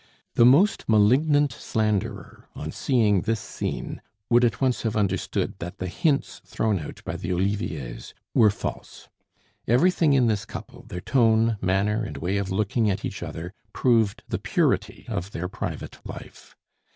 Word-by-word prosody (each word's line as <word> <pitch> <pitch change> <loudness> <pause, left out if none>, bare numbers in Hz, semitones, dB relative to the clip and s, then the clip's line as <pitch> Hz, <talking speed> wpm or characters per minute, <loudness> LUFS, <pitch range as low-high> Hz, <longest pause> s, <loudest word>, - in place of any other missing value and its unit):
The 120 - +6
most 165 - +4
malignant 135 +6 +4
slanderer 110 -1 -2
on - - -5
seeing 105 -7 +2
this 115 +3 -1
scene - - -5 0.3
would 120 +1 +6
at 120 - +2
once 130 -2 +1
have 110 -2 -2
understood 95 -3 0
that 85 +1 -6
the 95 - -4
hints 145 - 0
thrown 105 -4 -1
out 75 - -9
by - - -3
the 85 - -5
Oliviers 85 -10 -3 0.2
were 110 - +6
false. 105 - -6 0.6
Everything 155 +5 +4
in 130 -3 +4
this 110 -3 +1
couple, - - -9
their 90 - -6
tone, 115 -2 +3
manner, 100 +4 +1
and 110 - -6
way 95 +4 -1
of 100 -1 -2
looking 105 +3 +1
at 100 0 -2
each - - -5
other, 85 +3 -6 0.2
proved 115 -5 +2
the - - -2
purity - - 0
of 90 +4 -4
their 90 +2 -3
private - - -6
live. - - -11
110 Hz, 155 wpm, -25 LUFS, 95-120 Hz, 0.6 s, The